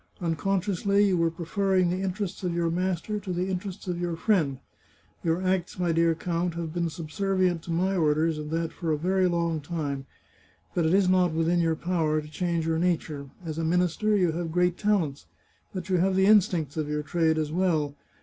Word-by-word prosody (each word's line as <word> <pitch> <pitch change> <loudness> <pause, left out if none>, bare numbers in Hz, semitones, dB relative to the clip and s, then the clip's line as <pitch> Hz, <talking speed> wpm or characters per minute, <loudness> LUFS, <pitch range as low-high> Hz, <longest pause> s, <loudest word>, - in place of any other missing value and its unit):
Unconsciously, 195 +3 +1
you 195 -2 +2
were 165 -1 +2
pre 165 +1 -7
ferring 190 0 +2
the 185 +1 -2
interests 195 0 -3
of 175 -2 -1
your 170 -1 +1
master 185 +4 -1
to 195 -2 -6
the 180 +2 -1
interests 190 +1 -5
of 175 -1 -2
your 175 -1 -1
friend. 165 -8 +1 0.7
Your 165 +2 0
acts, 185 -1 0
my 175 -2 +1
dear 165 0 +3
count, 170 0 -2
have 165 -2 -4
been 170 -1 0
subser 185 +5 -3
vient 180 -3 +2
to 170 - -5
my 185 +4 +1
orders, 155 -1 +2
and 150 0 -5
that 165 0 -2
for 165 -3 -2
a 155 - +1
very 185 +4 +2
long 170 -2 0
time. 145 -4 -4 0.7
But 170 -2 +1
it 170 - +3
is 195 -2 +4
not 180 -2 +3
within 165 +2 +2
your 165 -1 +2
power 160 -2 0
to 150 - -8
change 170 +1 -1
your 160 0 0
nature. 155 -5 -1 0.2
As 160 0 -4
a - - -1
minister 180 +5 +2
you 180 -4 +2
have 165 0 -3
great 180 +1 +2
talents, 180 -10 0 0.4
but 185 -2 -5
you 185 -2 +2
have 190 +2 +2
the 190 0 +4
instincts 180 -8 +3
of 155 -1 -2
your 150 0 -1
trade 160 +1 +1
as 155 -1 -1
well. 160 -5 +1
170 Hz, 205 wpm, -27 LUFS, 160-185 Hz, 0.7 s, is